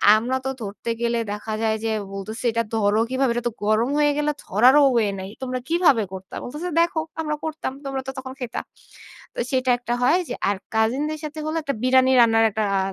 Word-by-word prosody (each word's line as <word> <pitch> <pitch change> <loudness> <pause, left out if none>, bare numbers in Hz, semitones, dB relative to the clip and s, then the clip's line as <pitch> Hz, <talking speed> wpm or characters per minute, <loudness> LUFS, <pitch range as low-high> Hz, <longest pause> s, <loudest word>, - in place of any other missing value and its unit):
আমরা 240 +4 0
তো 265 - 0
ধরতে 210 +2 -6
গেলে 235 0 +1
দেখা 210 +1 -4
যায় 220 -1 +1
যে, 225 - 0 0.2
বলতেছে 215 +5 -6
"এটা 230 +1 0
ধরো 210 0 +2
কিভাবে? 260 -1 +1
এটা 240 - -2
তো - - -14
গরম 215 +4 +2
হয়ে 295 0 +4
গেলে 300 0 +1
ধরারও 255 +8 +5
ওয়ে 225 -3 +3
নাই। 190 0 -6
তোমরা 255 -1 -2
কিভাবে 325 - +4
করতা?" 190 0 -9
বলতেছে 300 +8 -5
"দেখো 340 -1 +1 0.2
আমরা 300 -1 -2
করতাম, 310 -4 -3
তোমরা 270 -1 -3
তো - - -2
তখন 260 0 -6
খাইতা।" 245 -3 -4 0.7
তো - - -6
সেটা 260 -1 +1
একটা 240 0 -3
হয় 320 +8 +4
যে - - -2 0.2
আর 205 - 0 0.2
কাজিন 225 +6 +2
দের 310 0 -4
সাথে 305 +1 -6
হলো 310 +1 -2
একটা 280 - -1
বিরিয়ানি 260 0 +4
রান্নার 225 -1 +5
একটা 215 +1 -1
অ্যা 195 - +2
250 Hz, 210 wpm, -23 LUFS, 220-280 Hz, 0.7 s, ধরারও